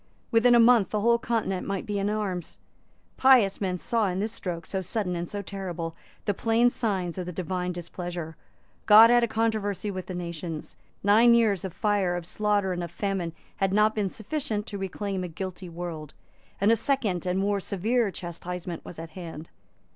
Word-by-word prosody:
Within 240 +1 +5
a - - +6
month 230 -4 +6
the 210 - -1
whole 235 +2 +4
Continent 225 -6 -1
might 195 -1 -2
be 205 -1 -2
in 200 +1 0
arms. 200 -5 -3 0.6
Pious 245 -8 +5
men 185 -2 0
saw 225 +3 0
in 180 -1 -2
this 215 +2 -1
stroke, 175 -6 -5
so 190 - -3
sudden 185 -1 -2
and 170 0 -4
so 205 -1 -4
terrible, 180 -4 -5 0.3
the 205 - +1
plain 230 +4 +3
signs 190 -7 -2
of 180 - -4
the - - -3
divine 180 +1 -2
displeasure. 175 -1 -6 0.5
God 225 +2 +9
had 240 0 +5
a - - +3
controversy 215 -3 -1
with 185 -1 -6
the 185 - -5
nations. 170 -2 -6 0.3
Nine 225 +4 +6
years 215 -6 +2
of 190 - -4
fire, 200 -2 +1
of 175 -1 -4
slaughter 205 0 0
and 175 0 -3
of 170 - -5
famine 180 -2 -2 0.2
had 195 -1 +1
not 215 +1 +4
been 210 -3 -1
sufficient 220 0 -3
to 200 -3 -6
reclaim 195 0 -3
a - - -3
guilty 185 +2 -6
world; 165 -3 -6 0.4
and 200 +3 +4
a - - +6
second 220 - 0
and 180 +1 0
more 200 +1 +1
severe 215 +5 0
chastisement 175 -1 -6
was 175 - -10
at 165 0 -8
hand. 165 -2 -8
195 Hz, 190 wpm, -27 LUFS, 175-215 Hz, 0.6 s, God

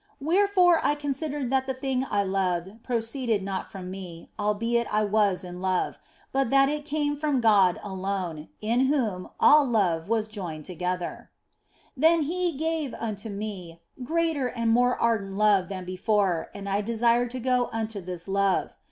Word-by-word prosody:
Wherefore 360 +2 +3
I 295 - +2
considered 290 -2 -3
that 265 0 +1
the 265 - -2
thing 265 0 -1
I 205 -1 +1
loved 190 +1 -2
proceeded 230 -2 -1
not 195 -1 -4
from 185 -2 -7
me, 180 -3 -9
albeit 230 +3 0
I 215 0 +2
was 205 -3 +2
in 180 0 -8
love, 185 -1 -1 0.3
but 270 -2 +1
that 275 +1 +5
it 295 0 -3
came 290 -1 -1
from 295 -2 0
God 200 -6 +4
alone, 190 -5 -4
in 235 +5 +2
whom 225 -11 -1
all 300 0 +7
love 195 -9 +1
was 225 -1 +1
joined 175 -8 -6
together. 180 0 -4 0.7
Then 320 +4 +4
gave 325 -3 -1
He - - -8
unto 220 -1 -5
me 200 -5 -6 0.2
greater 320 -1 0
and 230 -2 0
more 245 +2 +3
ardent 205 -4 0
love 205 -3 +3
than 185 -2 -5
before, 185 -1 0
and 200 0 -8
I 200 +1 0
desired 235 +2 +2
to 255 +2 -5
go 250 0 +1
unto 225 -2 -3
this 180 0 -7
love. 195 0 +1
220 Hz, 160 wpm, -26 LUFS, 190-265 Hz, 0.7 s, all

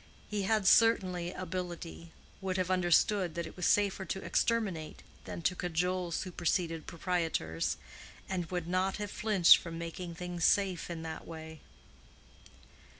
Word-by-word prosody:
He 210 -1 -2
had 215 -3 +2
certainly 185 -6 +4
ability, 175 -2 -6 0.3
would 190 -1 -1
have 185 0 0
understood 180 0 +3
that 170 0 -2
it 160 - -10
was 180 - 0
safer 200 -2 +2
to 190 +2 -4
exterminate 195 -10 0 0.2
than 170 - -6
to 180 - +2
cajole 180 +1 -1
superseded 170 -1 -1
proprietors, 165 - -1 0.5
and 180 -3 -2
would 180 -2 -3
not 185 +2 0
have 205 -1 -4
flinched 205 -5 +6
from 165 -1 -7
making 170 +1 -6
things 175 0 -5
safe 190 -3 +2
in 165 -2 -5
that 160 -1 -6
way. 160 -1 -9
180 Hz, 140 wpm, -32 LUFS, 170-190 Hz, 0.5 s, flinched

